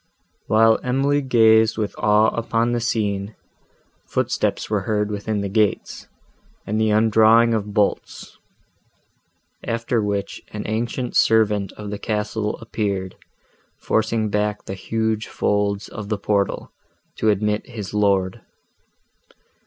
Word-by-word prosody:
While 110 +1 +4
Emily 135 +3 +1
gazed 110 -4 +4
with 105 -2 -2
awe 105 +1 +4
upon 115 0 0
the 120 - 0
scene, 105 -3 -2 0.7
footsteps - - -1
were 105 -1 0
heard 105 -1 0
within 105 0 -2
the 100 - -2
gates, 105 +1 -1 0.6
and 110 +2 -1
the 110 - +2
undrawing 110 +2 +4
of 105 -1 -3
bolts; 105 -2 -2 1.2
after 115 0 -1
which 100 -1 -3
an 105 -1 -5
ancient 120 +3 -3
servant 105 -3 +3
of 105 -1 -8
the 105 - -5
castle 105 0 -2
appeared, 100 -5 -3 0.6
forcing 110 0 0
back 105 0 -1
the - - -5
huge 110 +3 -2
folds 100 0 -1
of 105 -1 -8
the 105 - 0
portal, 100 0 -1 0.5
to 110 - +1
admit 105 +1 0
his 105 -5 -7
lord. 100 -3 +1
105 Hz, 120 wpm, -21 LUFS, 105-110 Hz, 1.2 s, While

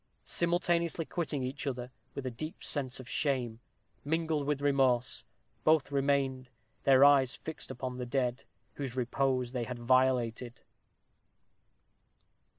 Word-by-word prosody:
Simultaneously 170 -1 +1
quitting 150 -6 -2
each 135 +3 -4
other, 125 -2 -4 0.2
with 140 - -5
a 130 - -2
deep 155 - -7
sense 135 -3 0
of 130 - -9
shame, 130 -6 0 0.4
mingled 160 -1 0
with 145 -2 +1
remorse, 135 -4 +2 0.4
both 155 -3 +3
remained, 135 -2 +1 0.4
their 135 0 +7
eyes 135 -3 +5
fixed 160 - -7
upon 130 0 -5
the 125 - -3
dead, 125 -1 -1 0.3
whose 135 -4 -4
repose 125 0 0
they 125 -2 -2
had 125 0 -5
violated. 125 -1 +1
135 Hz, 125 wpm, -31 LUFS, 125-145 Hz, 0.4 s, their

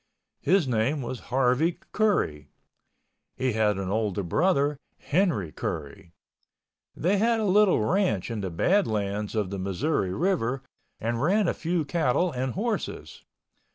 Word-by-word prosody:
His 175 -1 +3
name 125 +4 0
was 125 0 -5
Harvey 135 +6 +2
Curry. 80 - 0 0.9
He 130 -2 0
had 105 -2 +2
an 95 -1 -3
older 105 -2 -1
brother, 145 - +1 0.2
Henry 150 - 0
Curry. 80 +2 -5 0.8
They 185 +5 +1
had 230 +1 +2
a 220 - 0
little 195 - +4
ranch 175 - +1
in 110 -2 -3
the 95 - -3
Badlands 105 - 0
of 105 -3 -1
the 100 - -4
Missouri 95 - -1
River 135 - 0 0.4
and 115 +1 -2
ran 195 +6 +3
a - - +1
few 170 -1 -1
cattle 165 +3 +1
and 130 -1 -2
horses. 215 +3 -3
130 Hz, 135 wpm, -26 LUFS, -, 0.9 s, little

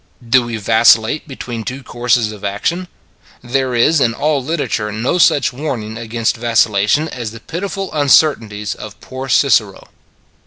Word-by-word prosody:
Do 125 +2 +5
we 115 -1 -4
vacillate 110 +5 +3
between 120 -5 -6
two 130 +3 -6
courses 120 -2 0
of 105 -2 -11
action? 165 - -2 0.6
There 130 0 -1
is 140 +6 +3
in 115 -3 +1
all 150 -3 0
literature 130 -8 -2
no 115 - -1
such 140 -6 +3
warning 125 -6 -4
against 115 +1 -2
vacillation 115 +4 +2
as 120 -7 -5
the 115 +2 -11
pitiful 195 - -5
uncertainties 125 -8 +2
of 105 -1 -10
poor 130 +1 -8
Cicero. 115 -6 +2
120 Hz, 145 wpm, -16 LUFS, 110-140 Hz, 0.6 s, Do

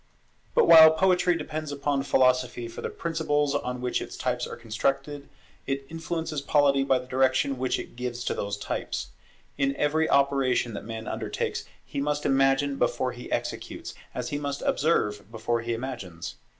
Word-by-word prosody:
But 475 -4 +5
while 160 - +11
Poetry 180 0 +3
depends 155 -1 -5
upon 140 -1 0
Philosophy 125 -3 +2
for 115 - -8
the - - -3
principles 150 -3 0
on 125 0 -2
which 125 0 -1
its - - -7
types 125 -1 -1
are - - -7
constructed, 135 +5 -2 0.4
it 135 0 -2
influences 160 -2 -3
Polity 140 -1 +3
by 135 -1 +3
the 125 - -6
direction 130 +1 +1
which 130 0 0
it - - -8
gives 125 0 -4
to - - -1
those 100 0 -3
types. 65 -9 -4 0.5
In 140 0 +1
every 155 +3 +1
operation 135 -4 +2
that 100 - -6
man 110 0 -6
undertakes, - - -3 0.2
he 140 - -4
must 150 +1 -1
imagine 135 +1 +3
before 130 - +1
he 120 0 -10
executes, - - -4 0.2
as - - -3
he 145 - -2
must 140 -1 -4
observe 105 -9 0
before 115 +1 -1
he 115 0 -2
imagines. 115 -9 -6
135 Hz, 165 wpm, -27 LUFS, 125-145 Hz, 0.5 s, while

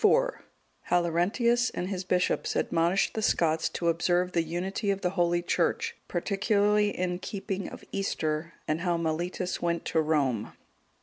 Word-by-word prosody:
How 175 0 +3
Laurentius 220 +9 +2
and 180 - -4
his 190 -2 -3
bishops 180 0 0
admonished 170 +4 +1
the 220 - -2
Scots 160 -6 +2
to 170 - -3
observe 175 +2 +2
the 170 - +2
unity 180 +5 -2
of 195 0 0
the 180 - 0
Holy 175 -2 +1
Church, 465 - 0
particularly 210 +1 +2
in 180 -2 -2
keeping 195 -1 -4
of - - -10
Easter; 160 -5 -2
and 155 +2 0
how 175 -2 +1
Mellitus 170 +3 -2
went 170 -1 -1
to 160 - +2
Rome. 140 -8 0
180 Hz, 145 wpm, -28 LUFS, 170-195 Hz, -, How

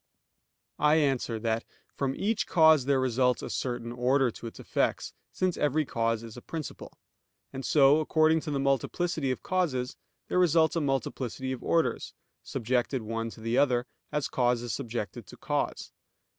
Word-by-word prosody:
I 150 +1 +4
answer 135 -6 +1
that, 115 0 0 0.3
From 135 -1 -2
each 220 +2 -1
cause 160 -5 +5
there 140 -1 +2
results 125 0 +1
a - - -5
certain 120 -2 -3
order 125 +1 +2
to 115 - -9
its 115 - -10
effects, - - -1 0.2
since 185 -2 -1
every 150 +1 +1
cause 115 -2 -1
is 115 -2 -9
a 125 - -9
principle; 160 +2 -7 0.6
and 135 0 -5
so, 145 +1 +5
according 155 +1 +3
to 155 - -6
the 140 -2 -1
multiplicity 140 +3 0
of 130 - -3
causes, 150 -10 -1 0.3
there - - +1
results 165 -2 +4
a 165 - +1
multiplicity 130 -1 -2
of 130 - -4
orders, 165 -1 0 0.3
subjected 125 0 -1
one 115 +1 -3
to 110 - -12
the 115 +2 +1
other, 125 -3 +2 0.3
as 150 -1 -1
cause 120 -1 +1
is 120 -4 -3
subjected 115 -6 -5
to - - -12
cause. - - -2
130 Hz, 165 wpm, -28 LUFS, 120-155 Hz, 0.6 s, cause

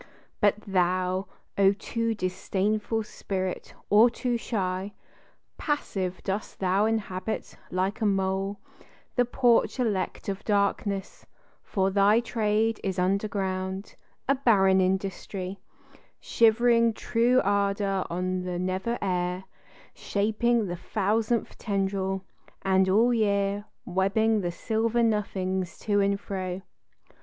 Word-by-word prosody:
But 205 -1 +4
thou, 185 0 0 0.3
O 195 0 +6
too 230 +2 -2
disdainful 205 +3 -1
spirit, 190 -3 -4 0.2
or 215 +4 +7
too 245 +1 -2
shy! 195 -4 -2 0.7
Passive 190 - -2
dost 195 +2 -4
thou 195 +2 +2
inhabit, 220 -1 -3
like 190 +4 -1
a 215 - +3
mole, 195 0 0 0.6
The 245 - +3
porch 245 +1 +2
elect 210 -7 -1
of 200 0 -3
darkness; 200 -1 -1 0.3
for 195 -2 0
thy 200 +3 +5
trade 225 -1 0
Is 190 -1 -2
underground, 190 0 -1 0.3
a 275 - +5
barren 195 -8 +4
industry, 190 0 -2 0.6
Shivering 230 0 +4
true 240 +3 +2
ardor 200 -1 +1
on 185 +1 -1
the 180 -1 -3
nether 185 +6 -1
air, 180 -1 -1 0.5
Shaping 220 +3 +1
the 175 -2 -4
thousandth 215 +4 -1
tendril, 195 -2 -1 0.4
and 190 0 +3
all 230 +6 +4
year 200 -2 +1 0.2
Webbing 200 +4 +2
the 175 -2 -2
silver 225 +6 0
nothings 190 -4 -1
to 205 -1 +2
and 200 0 +2
fro. 185 -2 -4
200 Hz, 110 wpm, -27 LUFS, 190-220 Hz, 0.7 s, or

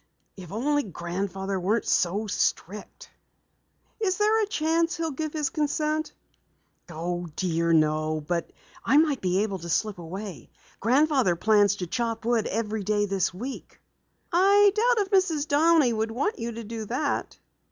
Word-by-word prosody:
If 180 -3 -11
only 290 +8 +1
Grandfather 190 - -4
weren't 210 +5 0
so 195 +5 +1
strict." 205 0 -3 0.9
"Is 375 -4 0
there 430 +1 +3
a 420 - 0
chance 330 -3 0
he'll 325 -1 -2
give 310 +2 -4
his 300 -3 -1
consent?" 305 +1 -1 0.8
"Oh, 175 +2 -4
dear, 170 -2 0
no. 155 0 +2
But 170 +2 -3 0.3
I 280 - +3
might 300 -4 +3
be 185 +2 +1
able 200 -3 -3
to 170 0 -8
slip 200 +4 -1
away. 175 - -8 0.3
Grandfather 260 - +3
plans 205 +2 +3
to 185 - -4
chop 230 +3 -3
wood 235 -2 +1
every 215 0 -2
day 205 +1 +1
this 195 -2 0
week." 240 +10 -8 0.5
"I 400 +3 +5
doubt 445 0 +2
if 385 - -19
Mrs. 340 -6 +2
Downey 300 -3 +4
would 220 0 -1
want 270 - -2
you 235 0 -3
to 230 +1 -7
do 225 0 -6
that." 255 +7 -2
225 Hz, 150 wpm, -26 LUFS, 185-305 Hz, 0.9 s, I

